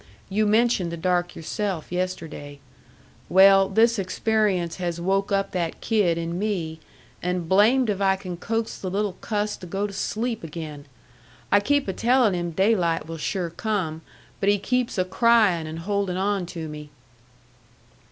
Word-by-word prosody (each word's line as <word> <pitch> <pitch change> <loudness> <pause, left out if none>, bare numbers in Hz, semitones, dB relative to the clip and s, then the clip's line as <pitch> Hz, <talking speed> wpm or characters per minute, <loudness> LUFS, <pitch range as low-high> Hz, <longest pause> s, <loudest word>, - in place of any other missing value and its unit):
You 210 +2 +1
mentioned 215 -5 +2
the 170 - -5
dark 175 +1 0
yourself 185 0 -4
yesterday. 170 -5 -4 0.7
Well, 195 +1 +6
this 225 +2 +3
experience 195 -3 0
has 175 -2 -3
woke 195 +3 0
up 195 0 0
that 170 -3 -2
kid 200 -7 +1
in 170 +1 -3
me, 175 -7 -2 0.4
and 180 -1 -2
blamed 225 +8 +4
if 200 -2 -1
I 190 -1 +3
can 185 -2 -6
coax 225 +5 -3
the 185 - -4
little 200 +1 -1
cuss 210 -1 -1
to 180 - -10
go 195 +4 -2
to 205 - -5
sleep 225 +3 -2
again! 155 -2 -7 0.6
I 205 - +6
keep 285 +6 +1
a 190 - -1
telling 240 0 +3
him 175 -1 -2
daylight 175 -2 +1
will 165 0 -6
sure 175 +1 -2
come, 175 -6 -2 0.4
but 200 - +2
he 205 - +4
keeps 250 +3 -1
a 185 - +2
crying 200 -5 +3
and 160 +1 -6
holding 195 +1 -1
on 195 -1 0
to 165 -2 -6
me." 150 -1 -8
190 Hz, 160 wpm, -24 LUFS, 170-210 Hz, 0.7 s, Well